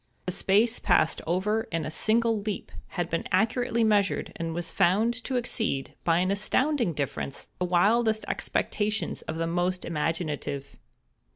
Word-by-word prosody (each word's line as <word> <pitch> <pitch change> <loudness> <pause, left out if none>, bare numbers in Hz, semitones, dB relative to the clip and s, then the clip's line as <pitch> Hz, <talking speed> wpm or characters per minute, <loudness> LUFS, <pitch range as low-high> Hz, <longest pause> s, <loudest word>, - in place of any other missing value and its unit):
The 180 - -1
space 215 +6 +2
passed 175 -4 +2
over 210 +6 0
in 165 -2 -1
a 155 - -4
single 225 +4 +2
leap 210 -1 -4 0.3
had 175 -1 0
been 165 0 -2
accurately 230 +4 +2
measured, 205 -3 +2
and 165 0 -3
was 170 0 -4
found 200 +5 +3
to 265 - -2
exceed, 220 - -1
by 165 -1 +3
an 185 +2 +2
astounding 235 - +1
difference, 140 -1 -4
the 180 - +1
wildest 220 +5 +3
expectations 215 +1 -1
of 160 - -5
the 165 - 0
most 175 +2 -1
imaginative. 150 -3 -2
185 Hz, 150 wpm, -27 LUFS, 165-220 Hz, 0.3 s, found